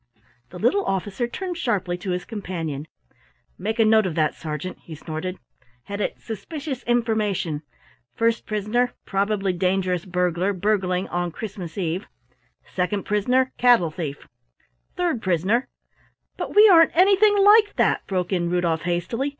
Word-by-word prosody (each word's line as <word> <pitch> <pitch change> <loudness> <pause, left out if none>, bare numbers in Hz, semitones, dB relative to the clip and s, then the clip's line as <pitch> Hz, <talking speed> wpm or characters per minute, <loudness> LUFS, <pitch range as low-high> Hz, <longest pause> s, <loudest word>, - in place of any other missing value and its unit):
The 180 - -10
little 305 - +2
officer 195 +5 -2
turned 355 +7 -5
sharply 185 -7 -1
to 185 - -6
his 180 0 -2
companion. 165 - -5 0.7
"Make 215 +5 -2
a 225 - +4
note 215 -2 +4
of 165 - -4
that, 155 -2 +1
Sergeant," 160 +3 -6
he 160 - -10
snorted. 160 +4 -5 0.5
"Head 200 +7 -5
it, - - -2
suspicious 270 - -6
information: 215 -10 0 0.5
first 230 0 0
prisoner, 215 +4 0
probably 195 -1 0
dangerous 180 -1 0
burglar 180 +1 0
burgling 185 -1 0
on 175 0 -1
Christmas 195 -2 -7
eve; 180 +1 -2 0.7
second 190 +2 -1
prisoner, 250 +6 +1
cattle 235 -10 +4
thief; 155 -4 -6 0.7
third 340 -10 0
prisoner 190 +8 +1 0.4
" - - -41
"But - - -5
we 425 +1 +9
aren't 330 -5 +6
anything 400 +3 +5
like 415 +1 +6
that," - - +1
broke 185 -1 -1
in 175 -2 0
Rudolf 170 -2 0
hastily. 175 +11 -1
195 Hz, 140 wpm, -23 LUFS, 175-235 Hz, 0.7 s, we